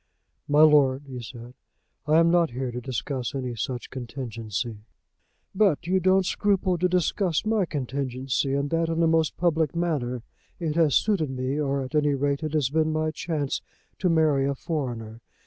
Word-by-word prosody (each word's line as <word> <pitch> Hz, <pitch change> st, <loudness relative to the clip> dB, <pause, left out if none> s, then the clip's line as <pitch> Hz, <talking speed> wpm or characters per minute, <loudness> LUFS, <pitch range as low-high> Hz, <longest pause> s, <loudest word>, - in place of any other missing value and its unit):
"My 145 Hz, +1 st, +5 dB
lord," 145 Hz, -3 st, +5 dB
he 130 Hz, -3 st, -7 dB
said, 120 Hz, +1 st, -10 dB, 0.5 s
"I 155 Hz, +1 st, +4 dB
am 165 Hz, 0 st, +5 dB
not 170 Hz, -2 st, +3 dB
here 125 Hz, +1 st, -4 dB
to 125 Hz, +1 st, -5 dB
discuss 130 Hz, +1 st, -3 dB
any 125 Hz, -2 st, -3 dB
such 120 Hz, +2 st, -4 dB
contingency." 115 Hz, -3 st, -5 dB, 0.8 s
"But 190 Hz, -5 st, +2 dB
you 185 Hz, +2 st, +2 dB
don't 190 Hz, +1 st, +3 dB
scruple 190 Hz, -3 st, +1 dB
to 180 Hz, +1 st, +2 dB
discuss 180 Hz, 0 st, +1 dB
my 215 Hz, -3 st, +2 dB
contingency, 135 Hz, -2 st, -2 dB
and 140 Hz, 0 st, -1 dB
that 165 Hz, 0 st, +1 dB
in 165 Hz, 0 st, -1 dB
the 165 Hz, -, +4 dB
most 160 Hz, -2 st, +2 dB
public 160 Hz, -3 st, +1 dB
manner. 135 Hz, -9 st, -1 dB, 0.3 s
It 160 Hz, -3 st, -2 dB
has 160 Hz, -6 st, +3 dB
suited 195 Hz, -9 st, +2 dB
me, 130 Hz, +2 st, -2 dB
or 140 Hz, -2 st, 0 dB
at 130 Hz, -, -8 dB
any 150 Hz, -2 st, +2 dB
rate 140 Hz, +1 st, 0 dB
it 155 Hz, -1 st, -3 dB
has 145 Hz, -4 st, +1 dB
been 155 Hz, 0 st, +2 dB
my 155 Hz, 0 st, 0 dB
chance, 155 Hz, -4 st, -2 dB, 0.4 s
to 185 Hz, -, +1 dB
marry 155 Hz, -4 st, +3 dB
a 140 Hz, -, -1 dB
foreigner. 120 Hz, -8 st, -4 dB
145 Hz, 175 wpm, -26 LUFS, 130-165 Hz, 0.8 s, My